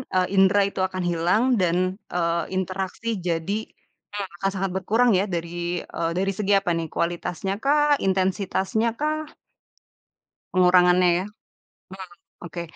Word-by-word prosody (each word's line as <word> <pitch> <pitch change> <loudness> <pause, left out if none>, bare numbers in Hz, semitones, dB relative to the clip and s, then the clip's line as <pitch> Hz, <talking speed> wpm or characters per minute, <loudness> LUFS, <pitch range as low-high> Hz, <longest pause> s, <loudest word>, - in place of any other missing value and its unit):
eee, 185 0 +3
indra 195 +1 +5
itu 200 - -7
akan 185 -1 -4
hilang 175 +7 +2 0.2
dan, 185 +1 +1 0.2
eee, 170 -1 0
interaksi 190 +4 -3 0.2
jadi, 170 +5 -1 0.5
hmm, 205 -2 -4
akan 195 +3 -1
sangat 195 -1 -2
berkurang 225 +6 +2
ya - - +2
dari, 175 +1 -3
eee, 165 0 -2
dari 195 +1 +1
segi 205 -1 -1
apa 180 -3 -2
nih? 165 -1 -3
Kualitasnya 175 +2 -2
kah? 295 +1 +4
Intensitasnya 190 +3 0
kah? 310 +1 -2 1.2
Pengurangannya 180 0 +5
ya? - - -5 1.0
Hmm, - - -21
oke. 170 0 -6
185 Hz, 130 wpm, -24 LUFS, 175-200 Hz, 1.2 s, indra